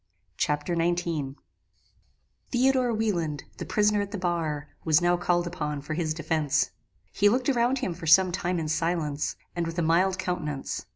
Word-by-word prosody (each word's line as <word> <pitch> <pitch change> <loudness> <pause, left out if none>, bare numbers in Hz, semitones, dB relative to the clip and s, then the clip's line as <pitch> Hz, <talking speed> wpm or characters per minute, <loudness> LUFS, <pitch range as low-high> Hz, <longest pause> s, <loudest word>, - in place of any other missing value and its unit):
Chapter 150 +4 0
XIX 165 -5 -1 1.2
"Theodore 255 0 +3
Wieland, 175 - -1
the - - -6
prisoner 210 -1 +2
at 200 - -3
the 205 - -5
bar, 165 -5 -2
was 155 -1 +4
now 175 0 +3
called 175 0 +1
upon 150 -4 -3
for 150 +2 -5
his 155 -1 -1
defence. 155 -3 0 0.4
He 205 - +4
looked 250 +5 +1
around 250 0 +2
him 250 -9 -2
for 165 -1 -8
some 185 +3 +6
time 180 0 -1
in 160 -2 -2
silence, 155 -2 -1 0.2
and 170 -1 -1
with 165 +1 -6
a 170 - +1
mild 180 +4 +3
countenance. 165 -7 -3
175 Hz, 165 wpm, -27 LUFS, 155-190 Hz, 1.2 s, some